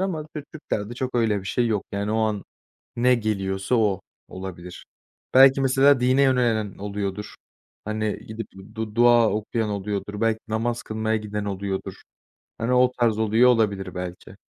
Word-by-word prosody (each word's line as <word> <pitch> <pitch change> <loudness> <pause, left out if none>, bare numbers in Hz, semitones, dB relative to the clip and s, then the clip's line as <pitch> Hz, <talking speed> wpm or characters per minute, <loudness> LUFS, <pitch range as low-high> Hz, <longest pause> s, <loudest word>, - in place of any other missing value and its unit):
ama 170 -5 -2
Türk 150 -1 -8
Türklerde 120 -7 -4
çok 130 0 -4
öyle 110 -4 +2
bir 95 - -10
şey 120 +5 +1
yok 110 -3 -1
yani 100 +1 -2
o 110 - +1
an 105 -2 -1 0.5
ne 125 +1 +4
geliyorsa 100 -1 -1
o 105 -5 +1 0.3
olabilir. 90 -1 -8 0.5
Belki 135 +1 +7
mesela 135 0 +4
dine 130 +2 +3
yönelen 120 -6 +1
oluyordur, 100 0 -4 0.5
hani, 110 -1 -2
gidip 110 0 -6 0.3
du 110 -1 -5
dua 120 -1 +5
okuyan 110 +1 -2
oluyordur, 100 +1 -4
belki 115 -1 +1
namaz 115 +2 -2
kılmaya 110 0 -1
giden 105 -1 -4
oluyordur. 100 -1 -3 0.7
Hani, 115 +3 -1
o 125 0 +4
tarz 115 -2 +2
oluyor 110 +3 +4
olabilir 105 -6 0
belki. 90 +1 -7
110 Hz, 155 wpm, -24 LUFS, 100-120 Hz, 0.7 s, Belki